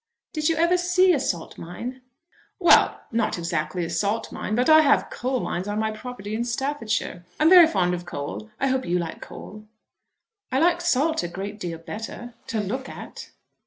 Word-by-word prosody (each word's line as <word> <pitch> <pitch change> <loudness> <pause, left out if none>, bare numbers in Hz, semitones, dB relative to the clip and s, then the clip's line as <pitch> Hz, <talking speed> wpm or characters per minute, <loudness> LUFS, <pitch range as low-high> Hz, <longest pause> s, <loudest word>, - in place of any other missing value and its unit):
"Did 310 -2 0
you 330 - +2
ever 340 +3 +3
see 360 +1 +4
a 290 - +1
salt 175 -10 -3
mine?" 240 +10 -7 0.6
"Well, 350 -3 +5
not 225 -4 0
exactly 170 0 -2
a - - -5
salt 210 +2 -1
mine; 215 - -3
but 250 +2 +2
I 315 0 +8
have 300 - +3
coal 255 +1 -2
mines 180 +3 -3
on 205 0 -2
my 220 0 0
property 215 -2 -7
in 225 +2 -1
Staffordshire. 235 -7 -2 0.2
I'm 315 +3 +5
very 355 -3 +10
fond 180 - +1
of 175 0 -4
coal. 160 +7 -6
I - - +1
hope 265 -1 +1
you 175 +1 +1
like 170 -2 -4
coal." 215 +1 -10 0.8
"I 260 - +1
like 340 +3 +3
salt 320 -1 +2
a 175 - -3
great 200 +4 -6
deal 170 -4 -4
better 225 +7 -7
to 225 - -2
look 245 +7 -3
at." - - -9
225 Hz, 190 wpm, -24 LUFS, 185-290 Hz, 0.8 s, very